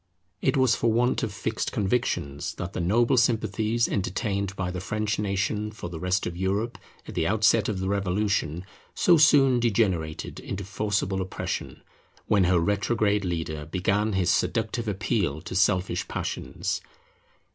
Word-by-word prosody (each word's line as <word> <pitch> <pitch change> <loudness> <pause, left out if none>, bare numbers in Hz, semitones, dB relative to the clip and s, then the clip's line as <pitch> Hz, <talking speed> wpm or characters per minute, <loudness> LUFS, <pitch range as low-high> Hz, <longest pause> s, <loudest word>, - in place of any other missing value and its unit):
It 135 - +2
was 130 -3 +4
for 115 - +1
want 120 +3 +2
of 110 - -2
fixed 110 +3 -3
convictions 95 - -1
that 95 +1 -5
the - - -3
noble 115 +9 +3
sympathies 110 -1 +1
entertained 100 0 -2
by 95 -2 -2
the 90 -1 -5
French 105 +1 -2
nation 105 +1 -1
for 105 -5 -7
the 80 - -6
rest 90 +2 0
of 85 - -4
Europe 100 +6 -1 0.3
at - - -7
the 80 -2 0
outset 110 +1 +3
of 105 - -2
the 95 - -2
Revolution 95 -3 0 0.3
so 175 -2 +5
soon 135 -4 +5
degenerated 95 -9 0
into 100 +1 -5
forcible 100 -1 -1
oppression, 95 - -4 0.4
when 100 -3 +3
her 90 0 +3
retrograde 105 +3 +1
leader 80 -4 -3
began 100 +5 0
his 90 -2 +2
seductive 115 +2 0
appeal 100 - -1
to 90 - -7
selfish 95 0 +1
passions. - - -3
100 Hz, 150 wpm, -26 LUFS, 90-110 Hz, 0.4 s, so